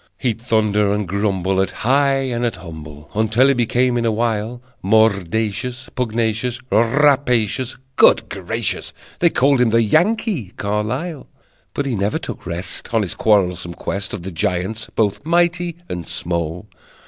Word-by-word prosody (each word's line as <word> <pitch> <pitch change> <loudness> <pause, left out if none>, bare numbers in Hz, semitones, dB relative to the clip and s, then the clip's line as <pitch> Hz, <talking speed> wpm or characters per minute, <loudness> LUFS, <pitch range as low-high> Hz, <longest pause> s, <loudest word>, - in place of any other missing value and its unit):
He'd 115 -4 -2
thunder 105 -3 +2
and 105 -1 -1
grumble 95 -1 0
At 95 - 0 0.2
high 135 +1 +3
and 120 -2 -2
at 120 - 0
humble 75 -3 -10
Until 110 +5 +3
he - - +5
became, 120 0 +1
in 115 - -1
a - - +2
while, 115 +1 -1 0.2
Mordacious, 110 +4 +1
pugnacious, 115 0 -1
Rapacious. 125 -1 +2 0.2
Good 110 -1 +5
gracious! 105 +4 -2 0.3
They 170 - +5
called 140 -3 +3
him 125 - +4
the 115 +1 +3
Yankee 170 - +1
Carlyle! 125 - -3 0.5
But 145 - -1
he 130 -4 -1
never 100 +1 0
took - - -7
rest 85 +2 -4
On 110 - +3
his 95 - -2
quarrelsome 90 -5 +1
quest 100 0 -4
Of 95 -4 -6
the 95 - -5
giants, 90 +6 -2
both 105 +1 0
mighty 175 +1 +1
and 90 -2 -5
small. 85 0 -3
110 Hz, 150 wpm, -20 LUFS, 95-125 Hz, 0.5 s, he